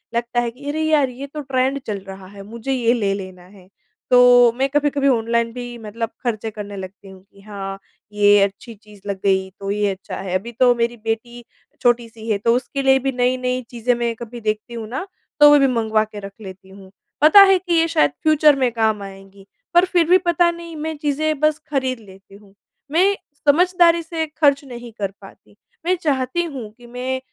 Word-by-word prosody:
लगता 240 +1 -1
है 240 -1 -1
कि 280 +4 -9
अरे 310 +2 -2
यार, 305 -4 +2
ये 260 +3 -8
तो 300 +2 -7
ट्रेंड 265 0 -1
चल 210 -2 -2
रहा 190 0 -10
है, 200 +1 -12
मुझे 230 +5 -6
ये 240 -3 +2
ले 205 -5 0
लेना 185 -2 -8
है। 190 -1 -18 0.4
तो 245 -1 +7
मैं 270 +1 +1
कभी-कभी 290 -1 +1
ऑनलाइन 230 -2 +1
भी 245 -1 -7
मतलब 225 0 -5
खर्चे 225 -3 -2
करने 205 -1 -8
लगती 190 +1 -10
हूँ 190 -1 -15
कि 200 - -19
हाँ, 195 -1 -7 0.3
ये 205 0 +5
अच्छी 200 +4 -4
चीज़ 210 -1 -18
लग 200 -1 -3
गई 190 -1 +1
तो 195 0 -4
ये 205 0 0
अच्छा 190 0 -8
है। 185 -1 -4
अभी 235 +5 -9
तो 245 +1 +3
मेरी 235 0 -1
बेटी 230 +2 -5 0.4
छोटी-सी 230 -2 -1
है 210 - +2
तो 230 +3 +1
उसके 275 +2 -3
लिए 265 0 +4
भी 270 +1 -1
नई-नई 250 0 0
चीज़ें 245 0 0
मैं 235 -1 -1
कभी 235 +1 -9
देखती 215 +2 -3
हूँ 225 -2 -6
ना 265 +9 -4 0.3
तो 295 0 +9
वो 295 - +7
भी 275 - +4
मँगवा 220 -3 +1
के 215 -1 -9
रख 200 0 -8
लेती 190 -1 -11
हूँ। 190 0 -15 0.3
पता 315 +7 +8
है 385 -1 +6
कि 355 -1 -3
ये 330 0 +3
शायद 145 - +2
फ्यूचर 305 -1 +5
में 255 -2 +2
काम 220 -2 0
आएँगी 195 0 -13 0.3
पर 350 +1 +5
फिर 360 -2 +2
भी 365 - +7
पता 345 -1 +2
नहीं 335 -1 -10
मैं 315 +1 -4
चीज़ें 295 +1 -1
बस 305 0 +2
खरीद 260 -3 -1
लेती 195 -2 -17
हूँ। 200 -1 -19 0.4
मैं 375 +5 +3 0.3
समझदारी 340 +2 +4
से 325 0 -3
खर्च 285 -2 +3
नहीं 240 -2 -9
कर 200 -2 -2
पाती। 195 +1 -17 0.3
मैं 365 +1 +2
चाहती 280 +2 0
हूँ 270 -10 -7
कि 245 -1 -15
मैं 250 +2 -4
240 Hz, 205 wpm, -20 LUFS, 205-280 Hz, 0.4 s, तो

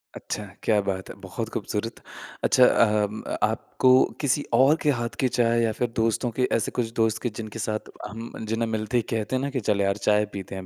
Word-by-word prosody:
अच्छा, 105 - -5 0.2
क्या 105 -2 +3
बात 95 -1 -3
है! - - -8
बहुत 105 +4 -5
ख़ूबसूरत, 110 +2 -3 0.4
अच्छा 130 - +6 0.2
अम 105 -1 0 0.2
आपको 130 - +1 0.3
किसी 145 0 +1
और 135 +4 +6
के 150 - +2
हाथ 120 0 -3
की 130 - +3
चाय 115 0 +3
या 115 - +2
फ़िर 120 - +1
दोस्तों 115 +2 +1
के 125 - +3
ऐसे - - -2
कुछ 115 -2 -1
दोस्त 110 -1 +1
के 120 - +1
जिनके 110 0 -6
साथ 110 0 -3 0.2
हम 115 +3 -8 0.2
जिन्हें 115 0 0
मिलते 110 +2 -1
ही 115 - +1
कहते 115 +3 -1
ना - - -2
कि 135 -2 -2
चल 100 -1 +3
यार 100 0 +1
चाय 105 0 +4
पीते 95 -1 -6
हैं 95 -1 -6
110 Hz, 210 wpm, -25 LUFS, 105-120 Hz, 0.4 s, अच्छा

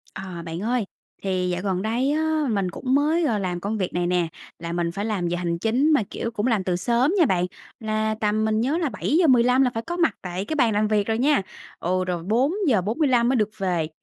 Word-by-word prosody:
À, 185 -3 -6
bạn 165 0 -5
ơi! 235 +1 0 0.4
Thì 185 -2 0
dạo 180 0 -2
gần 190 -2 -1
đây 235 +6 0
á 315 +1 +1
mình 200 -4 0
cũng 255 +8 -1
mới, 310 +4 +2
ờ, 230 -7 +1
làm 180 -3 -2
công 205 +4 -3
việc 185 -3 -2
này 175 0 0
nè, 175 -1 +1 0.3
là 170 0 -5
mình 170 -1 -1
phải 200 +4 -4
làm 200 -6 -1
giờ 175 +1 -1
hành 170 -1 -2
chính 250 - +2
mà, 285 - +3
kiểu, 230 - -4
cũng 225 0 -1
làm 220 -6 +1
từ 180 -1 0
sớm 235 - +1
nha 335 - +6
bạn, 180 -7 +1 0.3
là 215 0 -1
tầm 215 +1 +1
mình 220 0 +1
nhớ 275 +7 +1
là 330 -4 0
7:15 260 -5 +3
là 260 - +4
phải 225 - -3
có 345 +1 -3
mặt 335 -2 +2
tại 180 +1 -4
cái 315 - -3
bàn 235 -7 +3
làm 210 +1 +2
việc 210 -1 +1
rồi 225 0 0
nha. 280 0 +3 0.4
Ừ, 185 +2 0
rồi 175 -2 -3
4:45 245 - +2
mới 265 - +2
được 215 -3 +1
về. 180 -5 -1
215 Hz, 235 wpm, -24 LUFS, 185-255 Hz, 0.4 s, nha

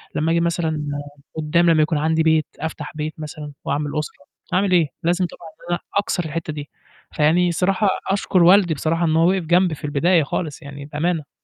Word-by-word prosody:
لمّا 160 +2 +1
أجي 170 - +3
مثلًا 165 -3 -1 0.5
قدّام 170 +3 +2
لمّا 160 -2 +4
يكون 155 0 +1
عَندي 160 +2 +1
بيت، 160 -1 +3
أفتح 160 -1 -5
بيت 155 0 -3
مثلًا، 150 -1 -7
وأعمل 145 +1 -1
أسرة، 150 -1 -7 0.3
هاعمل 190 +1 +2
إيه؟ 170 -4 +4 0.2
لازم 175 +2 +2
طبعًا 170 -1 -10
إن 155 - -19
أنا - - -6 0.2
أكسر 190 -3 0
الحتّة 160 0 -4
دي، 145 -1 -7 0.4
فيعني 165 +4 +3
الصراحة 190 +4 +1 0.2
أشكر 190 -2 +2
والدي 180 -2 +6
بصراحة 165 +3 0
إن 160 -1 +1
هو 165 +2 +4
وقَف 190 -2 +1
جنبي 175 0 +3
في 150 - -8
البداية 160 +3 +3
خالص، 150 +1 -4
يعني 140 -1 -9
بأمانة. 155 0 -2
160 Hz, 190 wpm, -21 LUFS, 150-175 Hz, 0.5 s, والدي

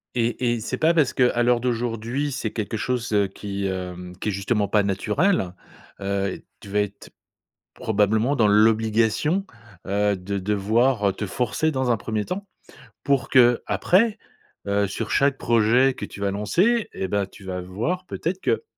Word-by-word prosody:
Et 120 0 0
et 120 - -2
c'est 120 +4 -4
pas 160 +4 +3
parce 150 -6 +2
qu'à 125 -2 +2
l'heure 120 0 +3
d'aujourd'hui, 120 +3 -2
c'est 110 -4 -3
quelque 110 0 -3
chose, 120 +2 -2
heu, 100 -1 +3
qui, 100 +1 -5
hem, 90 -1 -5
qui 105 - -2
est - - 0
justement 100 +2 0
pas 105 +1 +2
naturel. 105 - 0 0.5
Heu, 100 -1 -2 0.2
tu 100 - -12
vas 105 +1 +1
être, 100 0 -6 0.7
probablement 110 +5 +1
dans 110 - +4
l'obligation, 110 - +3 0.4
heu, 100 +1 +1
de 100 +2 -4
devoir 105 +2 +1
te 105 - -3
forcer 125 +9 0
dans 130 -4 -1
un 120 - +3
1er 105 0 -3
temps, 200 +2 -4 0.6
pour 140 -2 +1
qu'après, 130 - +3 0.5
heu, 100 0 +1
sur 100 - -4
chaque 140 -1 +2
projet 120 +3 +3
que - - -5
tu - - -11
vas 100 - +1
lancer 185 - +1
et 95 - -3
bah, 100 +1 0
tu 95 0 -16
vas 90 -1 -4
voir 115 - -3
peut-être, 180 +1 -3
que 455 - 0
110 Hz, 165 wpm, -23 LUFS, 100-130 Hz, 0.7 s, dans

